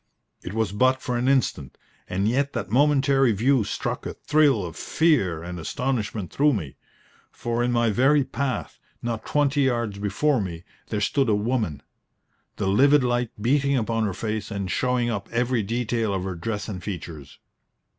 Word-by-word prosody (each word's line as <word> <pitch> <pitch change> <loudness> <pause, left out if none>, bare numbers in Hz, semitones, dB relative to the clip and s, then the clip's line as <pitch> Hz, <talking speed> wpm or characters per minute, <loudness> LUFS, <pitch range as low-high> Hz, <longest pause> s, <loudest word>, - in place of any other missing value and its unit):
It 95 - -7
was 110 -3 0
but 130 +5 +2
for 125 -2 -3
an 120 +1 0
instant, 130 - 0 0.3
and 95 +3 0
yet 140 +5 +1
that 100 0 -4
momentary 135 -1 +3
view 125 +4 +2
struck 100 - -3
a - - -6
thrill 145 -10 +2
of 85 - -7
fear 110 - +1
and 90 0 -6
astonishment 110 0 -2
through 145 +1 +3
me, 80 - -4 0.5
for 120 0 -2
in 125 - +1
my 120 -2 +2
very 135 +6 +4
path, 130 -4 -3 0.2
not 115 -2 -3
twenty 145 -1 +2
yards 120 -6 0
before 110 +7 +1
me, 85 -3 -5 0.2
there 105 -2 -2
stood 135 +4 +1
a 105 - +4
woman, 105 - -1 0.7
the - - -3
livid 140 +8 +5
light 120 -1 0
beating 140 +4 +2
upon 115 -1 0
her 100 - -1
face 110 0 -3
and 100 -3 -3
showing 125 +2 +1
up 105 -2 -4
every 120 0 +1
detail 115 -1 -1
of 95 - -2
her 95 -1 -3
dress 105 +4 -4
and 95 -4 -5
features. 80 -8 -7
115 Hz, 170 wpm, -24 LUFS, 100-130 Hz, 0.7 s, livid